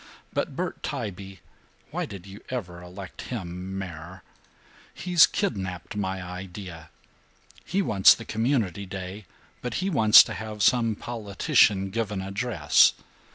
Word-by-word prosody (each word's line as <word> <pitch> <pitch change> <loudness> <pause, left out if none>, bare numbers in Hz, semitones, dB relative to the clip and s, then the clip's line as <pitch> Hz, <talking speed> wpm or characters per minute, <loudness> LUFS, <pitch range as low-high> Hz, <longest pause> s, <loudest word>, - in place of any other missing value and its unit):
But - - -2
Bert - - -4
Tybee 95 -3 -6 0.5
(why - - -3
did 95 -2 -9
you 100 +1 -11
ever 90 -9 -5
elect 90 +2 -9
him 95 -4 -5
mayor?) 90 -1 -8 0.7
he's 175 -2 +5
kidnapped 95 - -3
my 95 -2 -3
idea. 90 -2 -8 0.7
He 195 +1 0
wants 100 - +6
the 115 - -10
Community 110 -5 -1
Day, 95 +2 -7 0.4
but 125 -2 -4
he 190 +1 -1
wants 110 -8 +8
to - - -6
have 110 -2 -5
some 115 -3 +3
politician 100 -3 +1
'give 110 0 -2
an 95 -2 -3
address.' 100 -6 +3
100 Hz, 130 wpm, -26 LUFS, 90-110 Hz, 0.7 s, wants